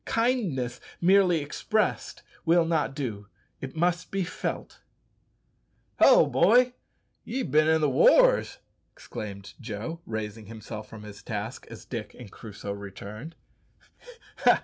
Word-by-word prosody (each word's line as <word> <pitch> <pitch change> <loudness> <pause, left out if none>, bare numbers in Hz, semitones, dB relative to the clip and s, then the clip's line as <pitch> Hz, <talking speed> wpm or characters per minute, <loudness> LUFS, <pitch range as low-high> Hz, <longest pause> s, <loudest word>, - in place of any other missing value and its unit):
Kindness 190 - 0 0.2
merely 180 -2 +4
expressed 215 +9 -1 0.2
will 170 0 +4
not 160 -4 0
do, 110 -8 -4 0.3
it 135 +2 -7
must 175 +2 0
be 195 -1 -1
felt. - - -5 1.2
"Hallo, - - +7
boy, 245 +8 +4 0.5
ye've 255 - -3
bin 155 +2 +4
i' 160 0 +5
the 155 -1 +2
wars!" - - +5 0.4
exclaimed 100 - -8
Joe, 115 +9 -5
raising 110 -1 -5
himself 110 -1 -8
from 110 -1 -10
his 105 -1 -10
task 110 +1 -5
as 115 -1 -11
Dick 115 -4 -6
and 120 -6 -11
Crusoe 105 -2 -8
returned. 100 - -9
135 Hz, 120 wpm, -27 LUFS, 105-175 Hz, 1.2 s, Hallo